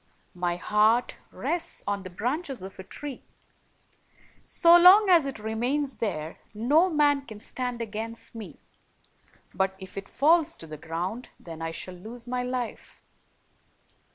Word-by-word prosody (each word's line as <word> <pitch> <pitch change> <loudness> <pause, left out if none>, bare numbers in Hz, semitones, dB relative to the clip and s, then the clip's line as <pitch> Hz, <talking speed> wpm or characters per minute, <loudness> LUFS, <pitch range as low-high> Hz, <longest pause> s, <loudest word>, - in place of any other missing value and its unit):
My 175 -1 -1
heart 215 +6 +2
rests 345 -1 -3
on 200 -1 -1
the 185 - -8
branches 255 - -3
of 190 0 -10
a - - -6
tree. 280 +6 -7 1.2
So 340 -1 +6
long 375 +4 +8
as 335 -6 +6
it 270 - -5
remains 245 +6 -2
there, 160 -8 -3 0.2
no 295 - +4
man 295 -3 +3
103 275 - -12
can 220 - -9
stand 245 +2 -4
against 225 +1 -6
me; 225 -2 -9 1.0
but 190 0 0
if 190 0 -8
it 195 - -12
falls 320 +2 +3
to - - -10
the 155 -1 -8
ground, 175 - -5
then 165 -2 -9
I 165 - -2
shall 180 +3 -6
lose 225 +7 -8
my 250 0 -2
life." 250 -2 -5
230 Hz, 150 wpm, -27 LUFS, 190-280 Hz, 1.2 s, long